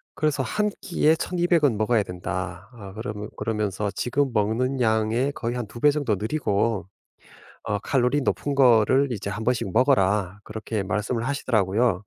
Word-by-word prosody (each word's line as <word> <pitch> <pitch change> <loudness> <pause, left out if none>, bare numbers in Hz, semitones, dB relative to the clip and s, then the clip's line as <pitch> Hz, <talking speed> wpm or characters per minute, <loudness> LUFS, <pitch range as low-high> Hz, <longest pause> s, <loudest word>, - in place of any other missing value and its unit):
그래서 150 -3 0
"1 210 +10 0
끼에 160 -3 +2
1,200 175 -2 +1
은 115 -7 +2
먹어야 110 0 +2
된다. 90 +1 -5
아 100 -5 -11
그러면 105 -2 -6
그러면서 105 -2 -2
지금 130 +5 0
먹는 115 +5 0
양의 115 +4 +1
거의 120 -2 -3
한 120 -3 -4
2 120 - -11
배 145 - +6
정도 140 -8 0
늘이고 110 - -1 0.8
어 105 -2 -2
칼로리 125 +5 +1
높은 140 +1 -1
거를 130 +1 +4
이제 100 -2 -4
1 105 +3 -4
번씩 115 -5 0
먹어라." 105 -6 +2
그렇게 110 -1 -4
말씀을 105 +4 -2
하시더라고요. 115 -5 +1
115 Hz, 305 characters per minute, -24 LUFS, 105-135 Hz, 0.8 s, 배